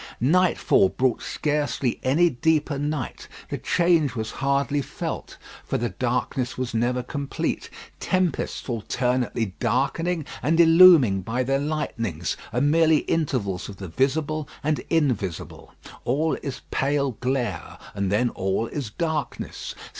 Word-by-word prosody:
Nightfall 165 - +3
brought 130 +2 0
scarcely 145 -4 -1
any 150 +7 +3
deeper 150 0 +1
night. 145 -3 -3 0.2
The - - -2
change 170 -7 +2
was 110 -1 -3
hardly 140 +1 +1
felt, - - -6 0.3
for - - -2
the 120 0 -1
darkness 125 +4 -2
was 130 -3 -3
never 125 +2 0
complete. 140 +2 -3 0.3
Tempests 185 -5 -1
alternately 120 -2 -1
darkening 145 +7 0 0.2
and 160 +5 +1
illumining 165 - +7
by 115 +7 -1
their 135 +2 +1
lightnings, 115 - -2 0.2
are 120 +3 0
merely 155 +2 +4
intervals 120 - -1
of 100 - -9
the 95 -3 -7
visible 145 - 0
and 150 0 +1
invisible. 125 - -1 0.3
All 150 +6 +1
is 135 -2 -5
pale 140 0 +1
glare, 125 - -2 0.2
and 100 -1 -1
then 120 +4 +2
all 95 +3 -1
is 130 -1 -5
darkness. 155 -1 -4
135 Hz, 125 wpm, -24 LUFS, 120-155 Hz, 0.3 s, illumining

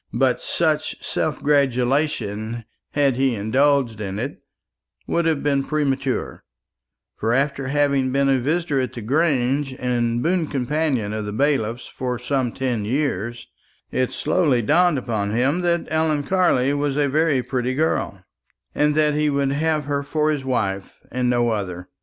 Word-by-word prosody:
But - - +2
such - - -1
self - - -2
gratulation, 125 -5 0 0.3
had 140 -4 +2
he 130 -2 +2
indulged 120 +1 +1
in 95 -1 -4
it, 135 +7 -5 0.6
would 170 0 0
have 160 -3 +1
been 140 -2 +1
premature; 135 -3 -1 0.7
for 115 - 0
after 135 0 0
having 140 -2 +1
been 140 +1 +2
a 135 -1 +3
visitor 150 +1 0
at 130 - -3
the 120 - -6
Grange, 135 0 +1
and 120 -1 0
boon 170 -1 +1
companion 135 -5 -1
of 110 -1 -3
the 105 - -4
bailiff's 120 -2 0
for 125 -1 -4
some 125 0 -1
ten 125 -5 -2
years, 120 -2 -2 0.5
it 130 -1 0
slowly 145 -10 +1
dawned 170 +5 +3
upon 110 -5 -2
him 135 +9 +1
that 170 -1 +1
Ellen 155 -2 +1
Carley 140 -6 +2
was 145 -1 -1
a 145 -1 +2
very 145 -2 +2
pretty 125 0 -2
girl, 135 - -1 0.5
and 150 0 +2
that 150 -1 +3
he 150 0 +1
would 140 -1 +1
have 155 +1 0
her 140 0 -1
for 150 +2 0
his 145 -3 -2
wife, 100 -7 -2
and 125 0 0
no 120 -1 +2
other. 90 -4 -4
135 Hz, 155 wpm, -22 LUFS, 120-150 Hz, 0.7 s, a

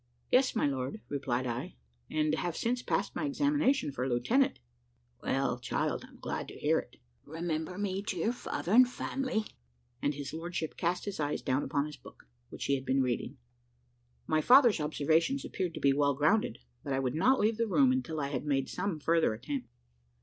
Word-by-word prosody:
"Yes, 255 0 +4
my 220 - +2
lord," 135 +8 -2
replied 130 -3 -1
I, 120 - -4 0.3
"and 155 0 +1
I - - -4
have 175 -2 -2
since 245 +2 0
passed - - -1
my - - -2
examination 285 - +2
for 130 0 -2
lieutenant." 175 - +2 0.6
"Well, 135 -2 0
child, 120 - -1
I'm - - -18
glad - - -4
to - - -10
hear - - +2
it. - - -11 0.3
Remember 160 +2 -3
me 195 -1 -1
to 200 -3 -4
your 220 +8 +1
father 190 -6 -4
and 250 +3 +7
family." 255 -3 -2 0.6
And 145 0 0
his 145 0 -6
lordship 165 0 -4
cast 175 +2 -1
his 200 -4 -4
eyes 145 0 -1
down 130 +1 +1
upon 140 0 0
his 150 -1 -8
book 120 - -16 0.2
which - - -6
he 140 - +2
had 135 -1 -1
been 135 0 +2
reading. 125 +2 -2 0.9
My 155 0 +2
father's 245 - +6
observations 160 - +1
appeared 180 -3 -3
to - - -5
be 140 -1 +4
well 140 0 +2
grounded, 155 +10 +2 0.3
but 140 - -2
I 135 - +1
would 130 -2 -1
not 255 +12 +3
leave 215 +1 +2
the 230 0 +1
room 260 +5 +4
until 210 -12 -1
I 140 -1 -1
had 135 -3 -3
made 135 -3 0
some 190 -6 -2
further 165 -6 +2
attempt. 270 - -5
160 Hz, 195 wpm, -31 LUFS, 140-220 Hz, 0.9 s, and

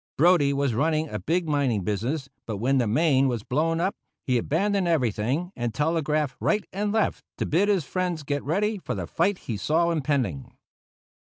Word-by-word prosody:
Brodie 160 -3 +5
was 140 -3 0
running 155 +5 +1
a - - -4
big 170 +1 0
mining 135 -9 +1
business; 120 - -2 0.2
but 110 -3 -3
when 130 +6 +2
the 120 - +1
Maine 135 +3 +3
was 120 -5 -2
blown 165 +7 0
up, 185 +3 +1 0.3
he 125 -3 +2
abandoned 195 - 0
everything 135 - 0
and 120 -2 -3
telegraphed 150 -3 0
right 210 -1 +1
and 205 +2 -1
left 220 0 0
to - - -1
bid 190 +7 +2
his 190 -7 +2
friends 180 -1 -2
get 145 0 -2
ready 205 +7 0
for 155 - -4
the 95 -3 -3
fight 195 - 0
he 110 - -3
saw 165 - +1
impending. 130 - -1
150 Hz, 180 wpm, -25 LUFS, 125-170 Hz, 0.3 s, Brodie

